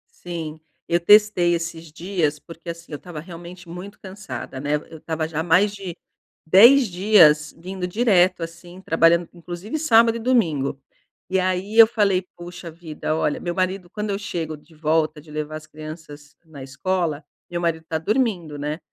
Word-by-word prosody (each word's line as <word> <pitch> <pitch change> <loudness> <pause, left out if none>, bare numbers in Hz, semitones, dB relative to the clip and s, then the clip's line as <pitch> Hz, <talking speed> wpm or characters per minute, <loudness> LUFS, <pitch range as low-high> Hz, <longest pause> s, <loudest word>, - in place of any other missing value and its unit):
Sim, 160 -3 -6 0.3
eu 170 +1 +2
testei 205 -2 +5
esses 165 -1 -4
dias 160 -3 -1
porque, 165 +2 -11
assim, 170 0 -8
eu 145 - -5
tava 175 -4 -8
realmente 175 +1 -11
muito 180 +4 -9
cansada, 190 -8 -8
né. 145 +2 0
Eu 155 +1 -7
tava 160 0 -3
já 160 -1 -4
há - - 0
mais 185 +5 +3
de 190 -4 -7 0.5
10 235 +9 +7
dias 175 -6 +5
vindo 180 +2 -5
direto 185 -4 +3
assim, 175 +2 -10
trabalhando 165 0 +3
inclusive 175 - -6
sábado 230 -6 +5
e - - -6
domingo. 160 - +1 0.5
E 190 0 +2
aí 185 +3 -1
eu 225 - +11
falei: 200 -5 +1
"poxa 175 -1 -9
vida, 155 -1 -4
olha" 150 -2 0
meu 175 - -3
marido, 185 -1 -1
quando 210 +3 -4
eu 200 - -1
chego 165 -7 -4
de 160 +2 -22
volta 155 0 0
de 155 - -19
levar 155 0 -4
as 155 0 -13
crianças 155 -1 -11
na 150 -4 -11
escola, 160 +2 -2 0.3
meu 175 0 -3
marido 160 -1 -1
tá 160 - -1
dormindo, 190 - -1
né. 150 +2 -4
170 Hz, 170 wpm, -22 LUFS, 155-190 Hz, 0.5 s, eu